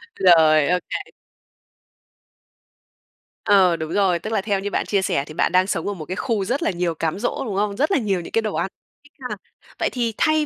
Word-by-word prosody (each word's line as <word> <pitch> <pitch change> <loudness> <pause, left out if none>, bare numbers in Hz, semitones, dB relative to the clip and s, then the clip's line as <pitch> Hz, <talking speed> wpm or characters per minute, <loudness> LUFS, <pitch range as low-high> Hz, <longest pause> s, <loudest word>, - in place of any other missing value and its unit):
Rồi, 155 -5 +5
ô 180 - +2
kê. - - -5 2.3
Ờ, 190 -4 +5
đúng 160 -1 -5
rồi, 185 -4 +2
tức 220 +4 -5
là 200 - +1
theo 200 -1 -1
như 205 +1 -4
bạn - - -1
chia 200 -2 +1
sẻ 140 -7 0
thì 155 - -10
bạn - - +1
đang 185 +1 +3
sống 165 -2 -2
ở 205 - -1
một 160 -5 -8
cái 185 - -4
khu 205 -2 -1
rất 270 - -1
là - - +1
nhiều 175 -2 -2
cám 165 +4 -2
dỗ, 245 - -2
đúng 205 - -4
không? 200 0 0
Rất 300 +7 +1
là 385 - +4
nhiều 200 -7 -1
những - - -10
cái 225 - +2
đồ 215 -2 -3
ăn, - - 0 0.4
thích 290 - -22 0.2
ha! - - -3 0.4
Vậy - - +1
thì 235 -3 -2
thay 310 -1 +2
195 Hz, 230 wpm, -22 LUFS, 170-220 Hz, 2.3 s, Rồi